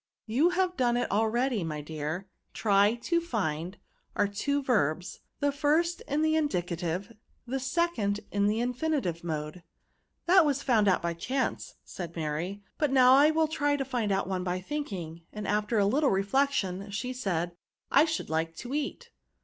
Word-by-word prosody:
*' - - -65
You 315 +7 +5
have 365 0 0
done 240 -4 +2
it 245 - -1
already; 225 +1 +1
my 155 -2 -3
dear; 155 +5 -4 0.3
try 205 +1 +3
to 340 0 +1
find 185 - -2 0.4
ate 205 0 +2
two 280 +7 0
verbs, 180 - 0 0.2
the 285 0 +2
first 310 +4 +1
in 295 +2 0
the 315 0 +3
in 310 -2 +2
dicative, 175 - -3 0.3
the 265 +2 -2
second 260 -8 0
in 200 0 +2
the 215 +2 +1
infinitive 250 - -1
mode." 155 +1 -4 0.3
" - - -47
That 365 +1 +6
was 285 -2 0
found 220 -6 +3
out 185 -3 +3
by 170 0 0
chance, 255 +10 -2
" - - -46
said 170 -2 -7
Mary; 165 +6 -3
" - - -44
but 300 -3 +2
now 255 -1 +7
I 285 +3 +7
will 315 0 +2
try 290 -2 +1
to 275 -1 -2
find 240 -5 -1
out 195 -1 0
one 185 -1 -2
by 180 0 -1
thinking 185 - -5
:" - - -40
and 210 -1 -5
after 210 +2 0
a 200 - +4
little 275 +8 +3
reflection, 200 -2 0
she 230 +5 -3
said, 175 -8 -2 0.2
" - - -53
I 285 +3 +6
should 315 - -3
like 165 +1 -1
to 245 +9 -7
eat." 300 +11 -3
220 Hz, 190 wpm, -29 LUFS, 180-285 Hz, 0.4 s, now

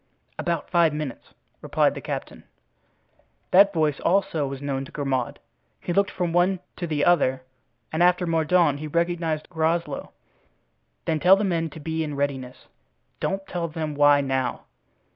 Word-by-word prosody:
"About 170 -3 -2
five 170 -4 +3
minutes," 150 -4 -6 0.3
replied - - +2
the - - -7
captain. - - -6 1.1
That 200 +2 +7
voice 155 -5 0
also 170 -5 +1
was 135 0 -6
known 135 -1 -3
to - - -14
Grimaud. 135 -4 -2 0.4
He 175 - -3
looked 200 +2 +2
from 175 -3 -2
one 180 +2 +3 0.2
to 175 - -3
the 150 -2 0
other 130 -7 +3 0.5
and 160 - 0
after 180 0 +4
Mordaunt 165 -2 +2
he 155 - -5
recognized 170 -1 -1
Groslow. 160 -2 -1 0.9
"Then 160 - 0
tell 180 +4 +7
the 200 - -1
men 165 -4 0
to 155 - -11
be 160 +1 -2
in 150 -2 -4
readiness—don't 140 +7 -5
tell 175 -3 -3
them 155 -1 -4
why 145 0 +5
now. 130 -2 -1
160 Hz, 150 wpm, -24 LUFS, 145-175 Hz, 1.1 s, That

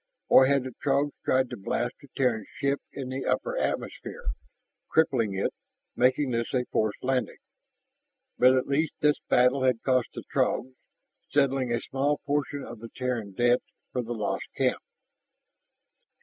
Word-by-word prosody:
Or 130 - +8
had 140 -1 +3
the 130 -1 -6
Throgs 140 +1 +2
tried 130 -1 +2
to 125 - -5
blast 120 +5 -2
the 140 - -14
Terran 120 -6 +1
ship 140 0 +1
in 135 -2 -6
the 130 +1 -3
upper - - 0
atmosphere, 485 -1 -3 0.6
crippling 120 -10 +2
it, 95 - 0 0.4
making 130 +1 +3
this 115 +2 -1
a 125 -1 +1
forced 110 -1 0
landing? 130 0 0 1.0
But 130 +1 +7
at 130 - +1
least 150 +3 0
this 150 0 +3
battle 125 +2 +4
had 130 -3 +2
cost 130 -2 +2
the - - -6
Throgs, 130 +1 +1 0.6
settling 135 -3 +2
a 120 - +1
small 140 +4 0
portion 145 0 -1
of 120 - -9
the 115 +1 -9
Terran 120 -6 -3
debt 120 +4 +3 0.3
for 125 - 0
the 120 0 -4
lost 105 -2 -2
camp. - - +1
130 Hz, 155 wpm, -27 LUFS, 120-140 Hz, 1.0 s, Or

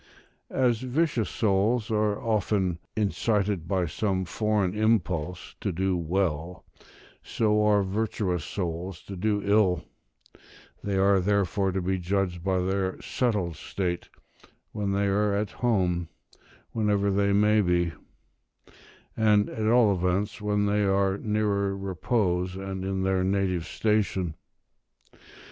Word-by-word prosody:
As 125 -4 +1
vicious 130 - 0
souls 110 +3 +1
are 105 -1 +1
often 100 -6 0 0.2
incited 105 -3 0
by 95 -1 +1
some 95 -1 -1
foreign 105 0 0
impulse 90 -6 0
to 100 - -1
do 95 +2 0
well, 85 -1 -2 0.6
so 105 -1 +1
are 105 -1 +4
virtuous 95 -3 -1
souls 90 -1 -4
to 100 - -8
do 105 +2 0
ill; 100 -4 +3 1.0
they 100 -1 -1
are 100 0 +4
therefore 100 0 +1
to 95 -1 -1
be 95 +1 0
judged 90 -1 -1
by 95 0 +1
their 95 +1 -1
settled 105 - -1
state, 90 +1 -3 0.6
when 100 -2 -2
they 100 +1 +1
are 100 +1 +1
at 100 -1 -1
home, 90 -8 0 0.6
whenever 105 -2 +1
that 100 0 +2
may 105 +1 +4
be; 85 -3 +1 1.2
and, 105 -2 +3
at 110 -1 -2
all 115 -3 +5
events, 90 +3 -1
when 105 0 +1
they 105 +1 +1
are 95 0 +1
nearer 100 -2 0
repose, 95 -1 -1
and 95 0 -5
in 95 0 -2
their 95 -1 +1
native 95 -3 0
station. 100 -6 0
100 Hz, 125 wpm, -27 LUFS, 90-105 Hz, 1.2 s, all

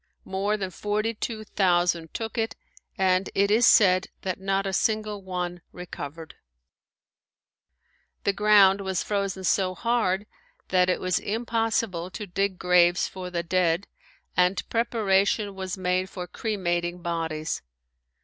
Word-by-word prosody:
More 200 +3 -1
than 190 -2 -4
forty 210 +4 -1
two 220 0 -4
thousand 175 -5 +1
took 225 -1 -5
it 225 -1 -1 0.4
and 185 -1 +2
it 200 +1 +3
is 225 +3 +5
said 185 -2 +5 0.2
that 185 -1 -3
not 195 0 0
a 195 - -2
single 215 0 0
one 180 -2 -4
recovered. 160 -2 -8 1.9
The 200 - +2
ground 200 -1 +5
was 190 -2 -1
frozen 195 -2 -2
so 185 0 +1
hard 215 -4 0 0.4
that 180 -1 +3
it 180 - +1
was 185 -1 0
impossible 225 -5 -1
to 210 +3 -6
dig 195 0 -1
graves 180 0 +4
for 185 -1 -7
the 170 -1 -2
dead 170 +1 +1 0.5
and 180 +2 +2
preparation 210 -3 +1
was 190 -1 -5
made 185 0 0
for 180 -2 -6
cremating 175 -3 -2
bodies. 165 -2 -2
190 Hz, 130 wpm, -26 LUFS, 180-205 Hz, 1.9 s, is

